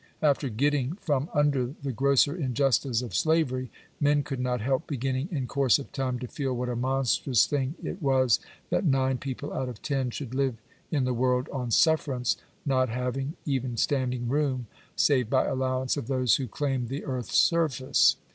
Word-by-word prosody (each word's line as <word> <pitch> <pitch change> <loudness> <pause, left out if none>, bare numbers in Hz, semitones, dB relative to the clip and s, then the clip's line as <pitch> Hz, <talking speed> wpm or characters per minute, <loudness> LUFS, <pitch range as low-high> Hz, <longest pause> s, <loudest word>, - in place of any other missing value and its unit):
After 140 -2 +2
getting 140 +4 0
from 150 -6 -1
under 145 -3 +1
the 140 - -1
grosser 140 +3 +3
injustice 130 - +1
of 120 - -7
slavery, 135 -6 +1 0.3
men 145 0 +3
could 135 -2 -5
not 125 -1 0
help 130 +7 -1
beginning 135 +2 -2
in 140 -7 -2
course 135 -1 +3
of 140 - -9
time 130 -2 -2
to 125 0 -6
feel 135 0 -3
what 125 0 -2
a 120 - -2
monstrous 130 -1 +2
thing 140 +1 -1
it 180 - -5
was 130 -4 +3 0.3
that - - +1
nine 135 -5 +2
people 135 -3 -5
out 130 - -2
of 120 -4 -10
ten 135 -3 -1
should 125 0 -6
live 135 -3 0 0.3
in 145 -5 +1
the 125 0 0
world 125 +2 +1
on 125 -3 -3
sufferance, 135 -2 +2 0.3
not 130 -3 +2
having 125 +5 -3
even 130 -4 -1
standing 125 -2 0
room, 135 -2 0 0.3
save 130 -6 +3
by 130 0 +3
allowance 130 -1 0
of 140 -6 -4
those 130 -3 +3
who 130 - -3
claimed 130 -1 -2
the 135 +3 -4
Earths 130 -4 -2
surface 155 -7 +3
(p. - - -32
130 Hz, 180 wpm, -27 LUFS, 125-140 Hz, 0.3 s, grosser